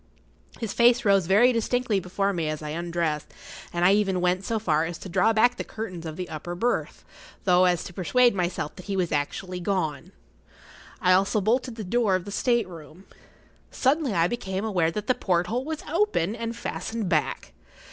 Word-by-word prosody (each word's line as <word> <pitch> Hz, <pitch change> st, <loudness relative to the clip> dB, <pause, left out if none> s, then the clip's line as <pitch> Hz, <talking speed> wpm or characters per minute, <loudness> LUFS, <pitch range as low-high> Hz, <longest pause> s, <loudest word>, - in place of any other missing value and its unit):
His 225 Hz, -4 st, -3 dB
face 240 Hz, 0 st, +4 dB
rose 195 Hz, -4 st, +4 dB
very 225 Hz, +7 st, +5 dB
distinctly 230 Hz, -2 st, 0 dB
before 195 Hz, +2 st, -1 dB
me 165 Hz, -4 st, -1 dB
as 155 Hz, 0 st, -4 dB
I 150 Hz, -, -5 dB
undressed, 165 Hz, -1 st, -2 dB, 0.4 s
and 175 Hz, 0 st, 0 dB
I 190 Hz, -, +6 dB
even 195 Hz, -3 st, +1 dB
went 180 Hz, +1 st, +1 dB
so 225 Hz, +3 st, -1 dB
far 160 Hz, -8 st, +1 dB
as 165 Hz, 0 st, -4 dB
to 190 Hz, -, -9 dB
draw 220 Hz, +5 st, +3 dB
back 240 Hz, +3 st, +3 dB
the -, -, -3 dB
curtains 185 Hz, -7 st, -6 dB
of 155 Hz, -, -6 dB
the 180 Hz, +1 st, -5 dB
upper 175 Hz, +3 st, -6 dB
berth, 240 Hz, +7 st, -2 dB
as -, -, -21 dB
though 180 Hz, -1 st, +4 dB
to 175 Hz, -, -8 dB
persuade 240 Hz, +7 st, +3 dB
myself 175 Hz, -5 st, -2 dB
that 185 Hz, -, -10 dB
he 195 Hz, -1 st, -2 dB
was 180 Hz, -3 st, 0 dB
actually 180 Hz, +5 st, -2 dB
gone. 175 Hz, -6 st, -2 dB, 0.9 s
I 185 Hz, -, +4 dB
also 195 Hz, +3 st, +3 dB
bolted 240 Hz, +4 st, 0 dB
the 220 Hz, -, -6 dB
door 210 Hz, 0 st, +1 dB
of 185 Hz, -1 st, -3 dB
the 205 Hz, -, -7 dB
state 235 Hz, 0 st, +1 dB
room. 165 Hz, +1 st, -12 dB, 0.6 s
Suddenly 275 Hz, -2 st, +1 dB
I[Pg 165 Hz, -3 st, +3 dB
37] 175 Hz, -, +2 dB
became 195 Hz, -4 st, -3 dB
aware 180 Hz, -7 st, +1 dB
that 210 Hz, +5 st, -4 dB
the 255 Hz, -, +3 dB
porthole 190 Hz, +6 st, -1 dB
was 315 Hz, 0 st, -5 dB
open, 335 Hz, -, +1 dB
and 230 Hz, 0 st, -4 dB
fastened 225 Hz, -2 st, -4 dB
back. 155 Hz, -6 st, -1 dB
190 Hz, 195 wpm, -26 LUFS, 175-230 Hz, 0.9 s, I